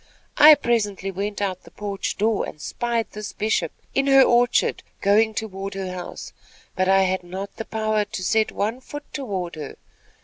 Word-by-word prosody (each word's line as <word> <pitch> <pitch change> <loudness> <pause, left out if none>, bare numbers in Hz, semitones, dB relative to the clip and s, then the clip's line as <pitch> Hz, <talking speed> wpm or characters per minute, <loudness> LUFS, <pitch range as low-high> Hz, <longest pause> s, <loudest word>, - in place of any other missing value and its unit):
I 305 +1 +10
presently 205 -6 -1
went 205 +2 -3
out 190 -2 -1
at - - -36
the - - -14
porch 200 -2 -4
door 215 0 +1
and 150 - -13
spied 235 +6 -2
this 210 0 -7
Bishop, 215 +1 0 0.2
in 275 0 +1
her 270 -1 +7
orchard, 245 0 +3 0.2
going 215 +2 +3
toward 195 -2 -4
her 190 -1 -4
house; 180 -1 -7 0.4
but 185 0 +1
I 195 0 +5
had 185 0 0
not 190 +3 -6 0.2
power 215 -1 0
to 205 -3 -6
set 220 +3 +2
one 220 +5 -2
foot 290 +3 -8
forward 195 - -4
unto - - -9
her. - - -12
205 Hz, 180 wpm, -23 LUFS, 195-225 Hz, 0.4 s, I